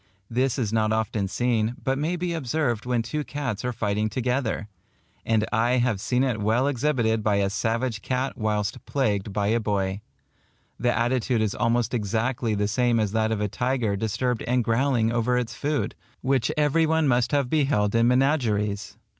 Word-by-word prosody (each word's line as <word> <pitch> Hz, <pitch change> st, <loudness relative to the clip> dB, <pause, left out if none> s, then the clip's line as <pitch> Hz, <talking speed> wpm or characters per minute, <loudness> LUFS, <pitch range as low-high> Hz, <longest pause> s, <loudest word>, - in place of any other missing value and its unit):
This 130 Hz, +2 st, +1 dB
is 110 Hz, -5 st, -1 dB
not 110 Hz, -1 st, +2 dB
often 110 Hz, -2 st, 0 dB
seen, 115 Hz, +1 st, 0 dB
but 135 Hz, -, +1 dB
may 155 Hz, +6 st, -1 dB
be 175 Hz, 0 st, -2 dB
observed 130 Hz, -6 st, -1 dB
when 120 Hz, -2 st, +1 dB
two 150 Hz, +6 st, -3 dB
cats 135 Hz, -8 st, -4 dB
are 125 Hz, -, -1 dB
fighting 105 Hz, -2 st, -1 dB
together; 125 Hz, -2 st, -1 dB, 0.6 s
and 110 Hz, -1 st, +2 dB
I 120 Hz, +2 st, +2 dB
have 120 Hz, -5 st, +1 dB
seen 125 Hz, +3 st, +1 dB
it 120 Hz, -5 st, -1 dB
well 110 Hz, +5 st, +2 dB
exhibited 120 Hz, -5 st, +1 dB
by 105 Hz, -1 st, +1 dB
a 100 Hz, -1 st, +1 dB
savage 115 Hz, +1 st, -1 dB
cat 130 Hz, +1 st, -2 dB
whilst 105 Hz, -2 st, -2 dB
plagued 105 Hz, -7 st, 0 dB
by 100 Hz, 0 st, 0 dB
a 115 Hz, +2 st, +2 dB
boy. 100 Hz, -2 st, -1 dB, 0.8 s
The 120 Hz, 0 st, +2 dB
attitude 120 Hz, 0 st, +1 dB
is 105 Hz, -, -1 dB
almost 115 Hz, +1 st, 0 dB
exactly 115 Hz, +1 st, -1 dB
the 105 Hz, 0 st, 0 dB
same 120 Hz, +2 st, +2 dB
as 105 Hz, -3 st, 0 dB
that 110 Hz, 0 st, +1 dB
of 110 Hz, -2 st, -1 dB
a 105 Hz, -, +1 dB
tiger 125 Hz, -1 st, -1 dB
disturbed 115 Hz, +4 st, -1 dB
and 125 Hz, 0 st, +2 dB
growling 115 Hz, 0 st, +1 dB
over 120 Hz, +1 st, +1 dB
its 125 Hz, -2 st, -2 dB
food, 145 Hz, +1 st, -1 dB, 0.3 s
which 130 Hz, 0 st, +1 dB
every 150 Hz, +2 st, +3 dB
one 160 Hz, -1 st, +2 dB
must 120 Hz, -2 st, +2 dB
have 140 Hz, -3 st, +2 dB
beheld 135 Hz, -8 st, +1 dB
in 115 Hz, 0 st, +4 dB
menageries. 110 Hz, -7 st, +1 dB
120 Hz, 180 wpm, -25 LUFS, 110-130 Hz, 0.8 s, in